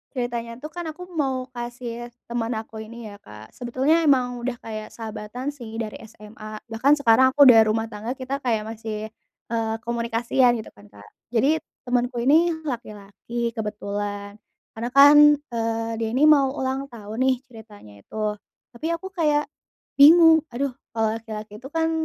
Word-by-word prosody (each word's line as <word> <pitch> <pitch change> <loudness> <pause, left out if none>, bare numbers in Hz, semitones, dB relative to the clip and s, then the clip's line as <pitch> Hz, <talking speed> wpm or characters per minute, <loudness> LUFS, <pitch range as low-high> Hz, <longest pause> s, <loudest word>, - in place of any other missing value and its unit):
ceritanya 235 -1 -3
tuh 305 - -6
kan 350 -1 -6
aku 335 +3 -7
mau 265 -5 -1
kasih 240 -1 -6 0.2
temen 235 0 -2
aku 220 0 -7
ini 235 +1 -10
ya 205 0 -12
Kak, 105 - -13
sebetulnya 260 +7 +1
emang 250 -3 +2
udah 245 +1 -3
kayak 215 -1 -6
sahabatan 225 +3 -6
sih 235 -6 -10
dari 225 -2 -4
SMA, 215 0 -11
bahkan 260 +6 +3
sekarang 260 0 +4
aku 285 - +7
udah 245 -4 +9
rumah 225 +1 0
tangga 220 +4 -4
kita 260 +1 -4
kayak 230 -6 -1
masih, 220 -1 -6 0.4
eee, 225 -1 -1
komunikasian 235 +1 +1
gitu 220 -2 -6
kan 105 0 -18
Kak, 100 0 -16 0.3
jadi 275 +8 +3 0.3
temanku 245 0 -1
ini 325 +6 +4
laki-laki 235 -1 -5
kebetulan, 205 -2 -5 0.4
karena 235 +2 -3
kan, 285 +1 +9 0.3
eee, 225 0 -2
dia 225 - -1
ini 275 - +2
mau 280 -3 +6
ulang 265 0 -2
tahun 220 -4 -9
nih 260 0 +3
ceritanya 215 - -14
itu, 210 -1 -3 0.3
tapi 245 +6 -5
aku 335 +3 -8
kayak, 300 -5 +1 0.6
bingung, 325 +2 +8
aduh 270 +3 -2 0.2
kalau 225 -1 +1
laki-laki 215 -2 -8
itu 265 - -9
kan 325 +1 0
235 Hz, 160 wpm, -23 LUFS, 220-265 Hz, 0.6 s, udah